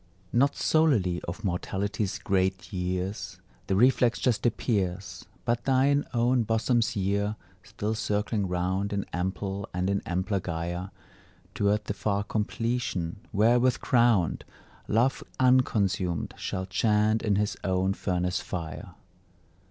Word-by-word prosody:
Not 140 +4 +3
solely 120 - +2
of 95 +5 -6
Mortality's 100 +2 -2
great 95 +1 -1
years 95 +1 -3 0.3
The 95 - +1
reflex 125 +2 +4
just 120 -1 +1
appears, 95 -5 -2 0.2
But 120 0 0
thine 140 +2 +3
own 120 +1 +2
bosom's 115 +1 +1
year, 100 +2 0 0.3
still 105 +2 -3
circling 105 -1 -1
round 95 +3 -1
In 100 -1 -1
ample 95 +2 -3
and 90 +2 0
in 100 - 0
ampler 95 +3 0
gyre 85 +1 -4 0.6
Toward 105 +1 +1
the 100 - -2
far 100 -1 -1
completion, 110 -5 -2
wherewith 120 +5 +3
crowned, 120 - +2 0.4
Love 120 +5 +2 0.2
unconsumed 100 -9 +2
shall 95 0 -3
chant 105 +3 +2
in 105 -3 +1
his 105 +1 0
own 95 0 +1
furnace 90 -1 -1
fire. 80 -5 -6
100 Hz, 120 wpm, -27 LUFS, 95-115 Hz, 0.6 s, reflex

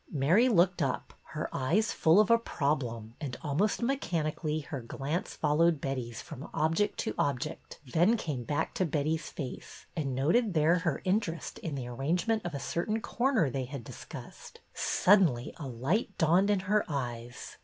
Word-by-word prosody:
Mary 170 - +4
looked 180 -4 +3
up, 135 -3 -2
her - - -4
eyes 175 +12 +1
full 165 +5 +4
of 215 +2 +4
a 230 - +6
problem, 125 - -2
and 135 -5 -4
almost 175 +10 0
mechanically 160 - -1
her 140 -2 -6
glance 140 +9 -3
followed 155 +1 +3
Betty's 125 -4 -4
from 155 -2 -9
object 165 +6 +1
to - - -2
ob 140 -3 +1
ject, - - -7
then 175 - +3
came 145 - -3
back 145 +4 -1
to - - 0
Betty's 155 +1 -1
face, 135 -5 -7
and 140 -5 -2
noted 185 - +2
there 160 +3 +4
her 170 -4 -1
interest 185 -4 -1
in 155 -4 -4
the 130 -3 -4
arrangement 170 - 0
of 175 -4 -4
a - - -3
cer 170 +4 -2
tain 220 +1 0
corner 240 - +1
they 130 0 -2
had 135 -1 -7
discussed. - - -10
Suddenly 180 - +3
a 145 - -6
light 145 - -1
dawned 175 +5 +4
in 205 -2 +2
her 205 +2 +2
eyes. 120 -4 -5
155 Hz, 170 wpm, -30 LUFS, 135-190 Hz, -, a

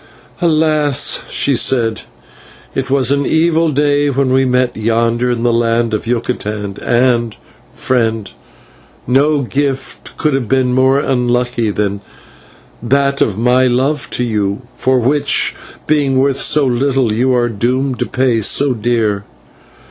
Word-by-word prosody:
"Alas!" 155 -4 +1
she - - +1
said, 115 -4 +1 0.7
"it - - -3
was 135 -1 +2
an 140 0 +1
evil 165 +2 +2
day 145 0 +1
when 135 -1 0
we 135 0 +3
met 125 -1 0
yonder 115 +2 0
in 120 -1 -2
the 120 -1 +2
land 115 0 0
of 110 +1 -3
Yucatan, 105 -4 -3
and, 120 -2 +1 0.4
friend, 115 -4 -1 0.7
no 140 +3 +2
gift 135 +1 -4
could 155 -2 0
have 135 -4 -1
been 130 0 +1
more 130 +1 +3
unlucky 125 -3 0
than 100 -1 -2 0.8
that 140 +3 0
of 105 -3 +1
my 125 +3 +3
love 130 +4 -1
to 125 - -2
you, 105 -1 -2
for 130 0 +1
which, 140 +5 +1 0.3
being 145 -3 +1
worth 135 0 +1
so 150 -2 +3
little, 130 -2 0
you 125 +3 +1
are 120 -1 +1
doomed 125 +4 -2
to - - -1
pay 125 -3 0
so 135 +6 +2
dear. 110 -3 -1
125 Hz, 140 wpm, -15 LUFS, 115-140 Hz, 0.8 s, we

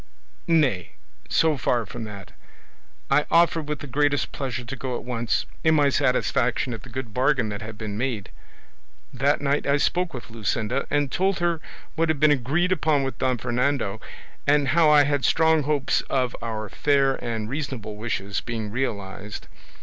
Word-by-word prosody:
Nay; 145 - +2 0.4
so 160 -2 +3
far 120 -1 0
from 115 +2 -7
that, 100 -3 -9 0.8
I 150 +2 +3
offered 165 -2 +3
with 150 -3 -3
the - - -6
greatest 145 +1 +1
pleasure 130 -2 -4
to 125 +3 -6
go 130 -1 -4
at - - -5
once, 120 -2 -1 0.2
in 160 0 +4
my 145 -2 +4
satisfaction 125 -1 +1
at 110 - -7
the 125 - -13
good 120 -3 -6
bargain 130 -2 +2
that 100 -1 -5
had 110 0 -7
been 105 -2 -5
made. 115 -7 -2 0.8
That 145 +2 +1
night 145 0 0
I 140 +1 +3
spoke 180 +4 0
with 125 -4 -9
Luscinda, 115 +3 -1
and 145 -2 +1
told 190 +4 +1
her 170 -2 0 0.3
what 165 0 0
had 155 -3 +1
been 155 0 +5
agreed 145 +7 +1
upon 155 -5 +2
with 135 - -4
Don 130 -1 +1
Fernando, 120 -3 -1 0.5
and 145 -2 +3
how 160 +1 +5
I 150 -1 +7
had 145 -2 0
strong 160 -1 +4
hopes 145 -1 +1
of 130 -2 0
our 110 -2 -4
fair 140 +3 +1
and 110 -2 -3
reasonable 130 -5 -4
wishes 100 -3 -3
being 110 -3 -4
realised. 105 -4 -4
135 Hz, 175 wpm, -24 LUFS, 115-145 Hz, 0.8 s, I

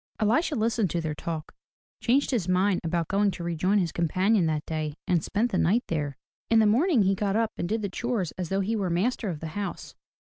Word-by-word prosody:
Elisha 245 +9 +2
listened 225 -3 +1
to 170 - -1
their 160 -2 -2
talk, 155 +1 -5 0.5
changed 265 +4 +2
his 220 -9 0
mind 185 +1 +2
about 165 -1 -1
going 200 +1 +2
to 180 -2 -5
rejoin 175 +4 +1
his 175 -5 +1
companion 185 +3 +2
that 155 -1 -1
day 155 -2 -3
and 175 -3 +2
spent 230 +4 0
the 185 - +1
night 220 +9 +3
there. 145 -4 -2 0.3
In 230 - +4
the 220 - +5
morning 250 - +4
he 195 +1 +3
got 200 +1 -1
up 225 0 +1
and 175 - -3
did 220 0 -1
the - - 0
chores 215 -2 -2
as 180 -3 -5
though 195 +1 +1
he 215 +4 -1
were 195 -4 -1
master 205 +5 0
of 160 -4 -5
the 160 - -4
house. 205 +1 -5
195 Hz, 225 wpm, -27 LUFS, 170-220 Hz, 0.5 s, the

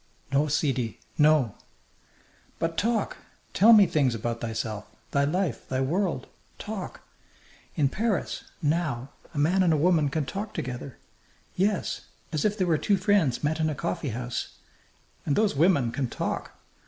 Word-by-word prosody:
"No, 140 +2 +3
sidi, 135 -6 0 0.2
no." 150 -7 +4 1.0
"But 165 0 -1
talk! 220 +3 0 0.4
Tell 215 +5 +7
me 210 -3 +9
things 140 -8 +1
about 115 +1 -3
thyself, 110 -2 -4 0.2
thy 140 0 +3
life, 170 -3 -1
thy 130 - 0
world. 170 +7 0 0.3
Talk! - - -6 0.7
In 145 - +3
Paris, 210 - -1 0.2
now, 145 -5 0 0.2
a 160 - -9
man 170 +7 +3
and 180 -3 +4
a 155 - +3
woman 160 -2 +3
can 150 +1 -1
talk 200 +8 -5
together 125 0 -5 0.6
yes 195 +1 0 0.3
as 155 - 0
if 210 0 +1
they 185 - +1
were 165 -4 +2
two 205 -2 +2
friends 185 - +2
met 155 +2 0
in 155 0 +2
a 150 - -2
coffeehouse. 130 -7 -3 0.7
And 140 - 0
those 210 -6 +2
women 140 -6 +3
can 130 0 -2
talk! - - -4
155 Hz, 150 wpm, -27 LUFS, 130-185 Hz, 1.0 s, me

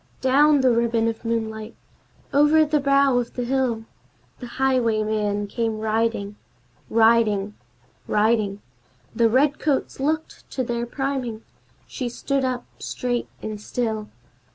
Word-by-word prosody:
Down 285 +2 +4
the 260 -1 +4
ribbon 230 -1 +1
of 225 0 -3
moonlight, 220 -1 -3 0.6
over 295 +2 +5
the 300 0 +1
brow 275 -2 +3
of 240 - -5
the 245 - -2
hill, 245 -3 0 0.5
The 245 - -7
highwayman 215 -5 +1
came 225 +1 -2
riding 215 -1 -1 0.5
Riding 220 -3 +3 0.5
riding 210 -2 +1 0.5
The 230 0 +4
redcoats 280 +3 +1
looked 310 +3 -2
to 260 - -1
their 240 -1 -2
priming! 260 -4 -3 0.4
She 250 -2 -4
stood 275 +3 -2
up 250 -1 -2
straight 245 -1 -2 0.2
and 215 -1 -5
still. 220 -2 -3
235 Hz, 120 wpm, -23 LUFS, 220-265 Hz, 0.6 s, over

